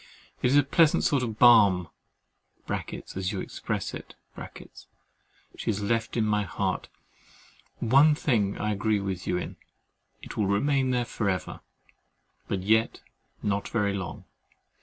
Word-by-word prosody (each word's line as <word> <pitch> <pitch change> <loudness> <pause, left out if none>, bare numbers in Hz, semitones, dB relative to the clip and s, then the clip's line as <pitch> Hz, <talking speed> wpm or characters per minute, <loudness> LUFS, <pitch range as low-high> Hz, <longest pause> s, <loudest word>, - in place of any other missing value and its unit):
It - - +3
is 135 +3 +4
a 145 - +6
pleasant 155 +3 +3
sort 140 -3 +2
of 110 -4 -3
balm 100 -8 +6 1.3
(as 95 0 -2
you 100 - -3
express - - -4
it) - - -9 1.4
she - - -8
has 105 -2 -1
left 115 +3 -1
in 110 - +2
my 105 -1 +1
heart! 100 - -3 0.9
One 140 +6 +5
thing 110 -10 0
I 105 - -1
agree 105 +1 0
with 95 -2 -4
you 90 - +1
in, - - -6 0.7
it - - -8
will 105 - +1
remain 130 +6 +1
there 125 -1 +1
for 110 -2 -2
ever; 90 -3 -3 0.9
but 95 -2 -2
yet 110 +3 +2 0.4
not 100 -1 -1
very 105 -3 0
long. 95 -2 -6
105 Hz, 140 wpm, -27 LUFS, 100-125 Hz, 1.4 s, a